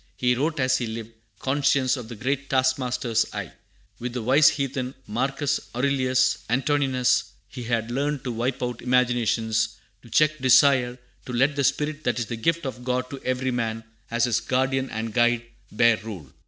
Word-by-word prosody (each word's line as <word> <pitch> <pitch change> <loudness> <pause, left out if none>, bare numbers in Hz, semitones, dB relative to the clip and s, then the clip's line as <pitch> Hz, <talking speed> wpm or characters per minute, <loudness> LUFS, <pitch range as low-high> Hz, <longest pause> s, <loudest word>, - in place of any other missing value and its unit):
He 125 0 +2
wrote 150 +5 -1
as 130 0 +2
he 120 - -2
lived, 110 0 -6 0.3
conscious 135 -1 +1
of 125 -4 -7
"the 120 - -7
great 135 +5 -2
Task 130 0 +2
master's 125 -2 0
eye." - - -5 0.5
With 120 0 -4
the 125 -2 -3
wise 135 +5 +6
heathen 135 -2 -3
Marcus 135 +5 -1 0.2
Aurelius 130 0 +2
Antoninus 130 -1 +2 0.2
he 125 -3 -8
had 115 0 -1
learned 140 +2 -1
to 125 - -3
"wipe 120 +3 -2
out 120 -1 -3
imaginations, 115 -3 +1 0.3
to 120 - -16
check 155 +5 +3
desire, 130 -1 +4 0.3
and 125 - -4
let 135 +4 +2
the 140 - 0
spirit 150 +3 0
that 120 -2 +1
is 120 - -1
the 115 - -5
gift 165 +9 0
of 125 -2 -5
God 125 0 -2
to 140 - -7
every 130 0 -1
man, 115 -2 -2 0.3
as 115 0 0
his 120 -3 +2
guardian 130 +1 0
and 110 0 -4
guide, 120 -1 +3 0.3
bear 115 +1 +4
rule." 100 - -9
125 Hz, 180 wpm, -25 LUFS, 120-135 Hz, 0.5 s, wise